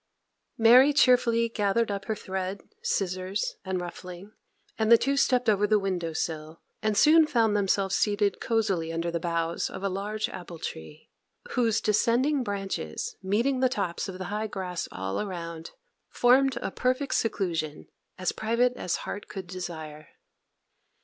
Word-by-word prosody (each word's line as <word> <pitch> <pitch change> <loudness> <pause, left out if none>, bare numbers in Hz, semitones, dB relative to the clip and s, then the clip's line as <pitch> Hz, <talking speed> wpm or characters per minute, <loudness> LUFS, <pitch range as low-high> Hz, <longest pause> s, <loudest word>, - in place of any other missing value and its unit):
Mary 250 +5 +7
cheerfully 240 -4 +4
gathered 215 0 0
up 200 -1 -4
her 220 - -1
thread, 190 -1 -4 0.2
scissors, 190 - -2
and 190 -1 -2
ruffling, 180 +2 -8 0.5
and 220 +1 +2
the 235 - +10
two 275 +4 0
stepped 250 -3 +2
over 210 -1 +3
the 215 0 +4
window 185 -4 -2
sill, 160 0 -4 0.2
and 215 -1 0
soon 315 +4 +6
found 230 -7 +2
themselves 195 -1 +1
seated 205 -1 +1
cozily 195 -8 0
under 165 +1 -2
the 170 - -1
boughs 170 0 -1
of 190 - -8
a 195 - +1
large 205 +3 -2
apple 175 -2 -8
tree, 80 - -8 0.4
whose 230 -3 +2
descending 240 +7 +2
branches, 195 - -4
meeting 230 +8 +1
the 255 0 +3
tops 200 -6 -2
of 185 - -6
the 185 - -5
high 215 +1 -1
grass 185 -4 -4
all 95 +1 -3
around, 170 -5 -6 0.4
formed 260 +1 +4
a - - -2
perfect 255 +5 0
seclusion, 165 -8 -1 0.3
as 185 -1 0
private 235 +3 +1
as 180 - -2
heart 205 - -6
could 190 -2 -7
desire. 160 -4 -7
200 Hz, 150 wpm, -27 LUFS, 175-230 Hz, 0.5 s, the